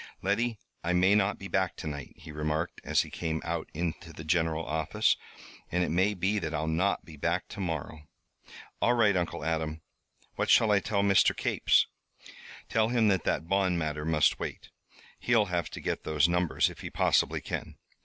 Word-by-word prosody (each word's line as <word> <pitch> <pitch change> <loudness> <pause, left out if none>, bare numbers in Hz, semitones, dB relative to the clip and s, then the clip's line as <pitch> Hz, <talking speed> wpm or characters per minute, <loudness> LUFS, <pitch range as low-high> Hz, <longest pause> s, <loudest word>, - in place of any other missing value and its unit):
"Letty, 110 +4 0 0.3
I 85 +1 0
may 95 +3 +4
not 105 -1 +2
be 100 - -7
back 95 -2 0
to - - -8
night," 70 -3 -6
he 80 - -11
remarked, 75 +3 -2
as - - +2
he - - -7
came 80 -2 -2
out 85 -1 -3
into 85 0 -4
the 80 - -9
general 80 0 0
office. 80 -1 +1 0.6
"And 90 +1 +1
it - - -1
may 95 +5 +2
be 100 +3 0
that 80 -4 -3
I'll 80 0 -1
not 85 +5 0
be 80 -2 -12
back - - -1
to 105 - -8
morrow." 80 -3 -4 0.7
"All 120 - +4
right, 105 -4 +4
Uncle 85 -3 -2
Adam. 80 -1 -2 0.6
What - - -1
shall 110 - +5
I 100 - +5
tell 100 0 0
Mr. 100 -1 +4
Capes?" - - +3 0.8
"Tell 110 -1 +2
him 115 -3 +3
that 95 -3 +1
that 80 - 0
bond 95 -1 +2
matter 75 -2 -2
must 80 -1 +2
wait. - - -6 0.5
He'll 115 -3 +3
have 85 -1 0
to - - -8
get - - -3
those 75 0 +2
numbers 90 -1 +2
if - - -13
he - - -6
possibly - - +2
can. - - -5
85 Hz, 190 wpm, -29 LUFS, 80-100 Hz, 0.8 s, shall